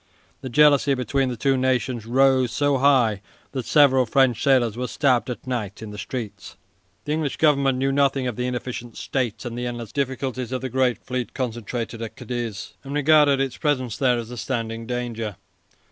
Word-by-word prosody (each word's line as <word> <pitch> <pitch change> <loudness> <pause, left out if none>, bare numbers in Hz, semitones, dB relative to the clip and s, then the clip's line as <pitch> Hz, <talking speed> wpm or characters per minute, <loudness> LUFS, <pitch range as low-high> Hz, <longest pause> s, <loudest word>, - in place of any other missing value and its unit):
The 130 - -5
jealousy 145 +1 +5
between 135 +1 0
the 125 - -4
two 135 +5 +2
nations 130 -3 0
rose 130 0 +3
so 145 -2 +1
high 125 -7 +3 0.3
that 130 -4 -4
several 135 -4 +5
French 125 -1 +3
sailors 125 -5 +3
were 125 +1 -3
stabbed 130 -5 +1
at 125 - -6
night 115 -6 -3
in 105 - -7
the 105 - -8
streets. 105 -5 -6 0.5
The 150 - -3
English 155 -2 -1
Government 140 -4 +3
knew 135 +1 +1
nothing 135 -1 +2
of 125 -3 -2
the 125 +2 -2
inefficient 120 -1 -5
state 125 -3 -2
and 120 -1 -5
the 125 0 -3
endless 120 -3 -6
difficulties 130 -2 -3
of 130 - -2
the 130 - -3
great 125 -1 +1
fleet 125 -1 -4
concentrated 120 -2 -4
at 115 - -6
Cadiz, 120 -5 -5
and 140 +1 -6
regarded 145 -1 +5
its 135 -2 -1
presence 130 -6 0
there 125 -3 +2
as 120 0 -6
a 125 - -7
standing 115 -2 -3
danger. 115 -4 -3
125 Hz, 185 wpm, -23 LUFS, 120-135 Hz, 0.5 s, jealousy